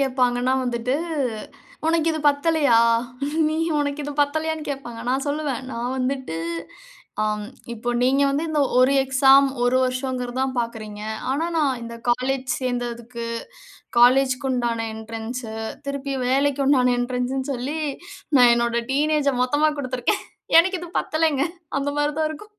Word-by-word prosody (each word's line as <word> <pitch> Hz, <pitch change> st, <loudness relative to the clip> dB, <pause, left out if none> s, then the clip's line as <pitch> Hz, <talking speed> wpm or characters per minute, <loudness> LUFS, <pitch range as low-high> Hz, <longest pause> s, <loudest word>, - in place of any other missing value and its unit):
கேட்பாங்கன்னா, 255 Hz, -2 st, +1 dB
வந்துட்டு 245 Hz, +1 st, -1 dB, 0.9 s
உனக்கு 330 Hz, 0 st, +2 dB
இது 315 Hz, -, -3 dB
பத்தலையா? 285 Hz, -3 st, +3 dB, 0.7 s
நீ 310 Hz, -, -1 dB, 0.2 s
உனக்கு 285 Hz, 0 st, -1 dB
இது 290 Hz, -, -4 dB
பத்தலையான்னு 315 Hz, +2 st, -1 dB
கேட்பாங்க. 255 Hz, -5 st, -5 dB
நான் 265 Hz, +2 st, 0 dB
சொல்லுவேன். 285 Hz, -4 st, -2 dB
நான் 240 Hz, +2 st, -3 dB
வந்துட்டு 260 Hz, -8 st, -2 dB, 0.9 s
ஆ -, -, +2 dB, 0.5 s
இப்போ 235 Hz, +1 st, -5 dB
நீங்க 265 Hz, +3 st, +3 dB
வந்து 285 Hz, +3 st, 0 dB
இந்த 310 Hz, -2 st, 0 dB, 0.2 s
1 255 Hz, +2 st, +5 dB
எக்ஸாம் 270 Hz, +1 st, +5 dB, 0.2 s
1 245 Hz, +1 st, +3 dB
வருஷங்கிறது 255 Hz, -1 st, -2 dB
தான் 265 Hz, 0 st, -1 dB
பார்க்கிறீங்க. 220 Hz, -3 st, -4 dB, 0.3 s
ஆனா, 285 Hz, +5 st, 0 dB
நான் 275 Hz, -5 st, +1 dB
இந்த 235 Hz, 0 st, -7 dB
காலேஜ் 255 Hz, +2 st, 0 dB
சேர்ந்ததுக்கு, 240 Hz, -2 st, -4 dB, 0.7 s
காலேஜ்க்குண்டான 250 Hz, -2 st, +3 dB
என்ட்ரன்ஸ் 225 Hz, +3 st, -6 dB, 0.4 s
திருப்பி 280 Hz, 0 st, -3 dB
வேலைக்கு 275 Hz, +2 st, +2 dB
உண்டான 250 Hz, -3 st, +4 dB
என்ட்ரன்ஸ்ன்னு 255 Hz, +2 st, -2 dB
சொல்லி 270 Hz, +5 st, -3 dB, 0.6 s
நான் 245 Hz, -2 st, +7 dB
என்னுடைய 235 Hz, 0 st, 0 dB
டீனேஜ 300 Hz, +1 st, +2 dB
மொத்தமா 290 Hz, +5 st, +2 dB
குடுத்திருக்கேன். 255 Hz, -, -1 dB, 0.4 s
எனக்கு 370 Hz, +2 st, +4 dB
இது 350 Hz, -, -7 dB
பத்தலங்க. 310 Hz, -3 st, +1 dB, 0.4 s
அந்த 280 Hz, +1 st, -1 dB
மாரி 295 Hz, 0 st, +1 dB
தான் 310 Hz, -1 st, +1 dB
இருக்கும். 420 Hz, +8 st, -10 dB
265 Hz, 130 wpm, -23 LUFS, 245-285 Hz, 0.9 s, நான்